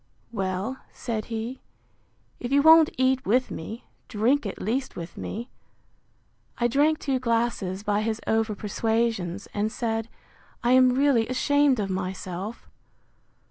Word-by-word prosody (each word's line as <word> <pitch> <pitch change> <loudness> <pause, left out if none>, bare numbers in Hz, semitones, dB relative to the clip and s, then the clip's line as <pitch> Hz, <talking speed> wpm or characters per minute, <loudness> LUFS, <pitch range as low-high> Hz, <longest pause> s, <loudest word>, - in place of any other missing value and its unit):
Well, 195 +4 -2
said 225 -3 -4
he, 230 +3 -5 0.8
if 245 - -5
you 280 0 +4
won't 320 0 +8
eat 260 0 +2
with 250 +5 +1
me, 220 +9 -6 0.2
drink 235 +3 +1
at 195 - -6
least 255 +7 -2
with 170 0 -7
me: 235 +4 -6 1.1
I 240 - +2
drank 295 +5 +3
two 270 -4 -1
glasses 230 -6 -1
by 210 -1 +1
his 220 0 -1
over 220 -1 +1
persuasions, 210 -3 -1
and 210 +1 -1
said, 225 -1 -2 0.5
I 240 - +3
am 255 0 +6
really 265 -5 +3
ashamed 280 0 +2
of 195 -2 -1
myself. 185 +2 -5
230 Hz, 135 wpm, -26 LUFS, 205-260 Hz, 1.1 s, won't